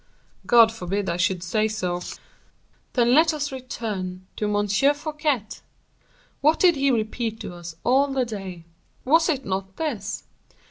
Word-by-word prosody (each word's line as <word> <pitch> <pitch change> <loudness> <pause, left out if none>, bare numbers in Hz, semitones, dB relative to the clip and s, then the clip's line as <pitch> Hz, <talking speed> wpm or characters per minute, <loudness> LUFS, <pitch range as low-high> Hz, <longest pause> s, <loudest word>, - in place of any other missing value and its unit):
"God 230 -2 +7
forbid 200 -2 -3
I 170 - -2
should 180 0 0
say 215 +4 +1
so." 180 -5 -2 0.9
"Then 240 -1 +3
let 320 +3 +5
us 290 -1 -3
return 205 -8 -5
to 210 - -1
M. 205 0 +1
Fouquet. 290 +2 +1 0.9
What 305 +3 +3
did 355 -3 +5
he 275 0 +2
repeat 225 -1 -1
to - - -6
us 175 -1 -9
all 270 +3 +4
the 270 -2 0
day? 190 -6 -7 0.4
Was 320 +5 +4
it 275 -4 -1
not 190 0 -3
this? 215 -12 -3
225 Hz, 145 wpm, -24 LUFS, 190-275 Hz, 0.9 s, God